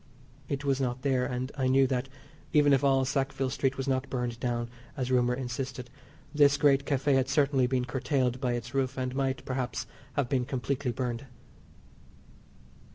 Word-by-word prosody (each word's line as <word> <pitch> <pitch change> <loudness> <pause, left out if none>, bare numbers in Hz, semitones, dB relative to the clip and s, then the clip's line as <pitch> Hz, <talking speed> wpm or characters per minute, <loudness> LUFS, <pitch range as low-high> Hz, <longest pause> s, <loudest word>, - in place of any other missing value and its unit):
It 140 0 -2
was 135 -1 +1
not 125 -1 -2
there, 130 -2 +2
and 125 +2 -3
I 130 -2 0
knew 135 +1 +5
that, 130 0 -1 0.4
even 145 -2 +5
if 135 0 +3
all 135 -1 +4
Sackville 135 -1 -1
Street 135 0 0
was 135 0 -3
not 135 0 0
burned 120 -2 -3
down, 120 -1 -1 0.3
as 130 -1 -2
rumour 125 -1 +3
insisted, 125 -1 -5 0.4
this 145 -1 +5
great 140 -2 +4
Café 140 0 +2
had 135 0 +2
certainly 140 -2 +3
been 125 -1 0
curtailed 130 -1 0
by 125 -2 +1
its 120 0 -5
roof 135 -1 0
and 130 -1 -2
might, 135 -1 -1
perhaps, 130 -1 -2 0.3
have 135 -1 0
been 125 -1 0
completely 135 0 -2
burned. 125 +1 -3
130 Hz, 170 wpm, -29 LUFS, 125-135 Hz, 0.4 s, knew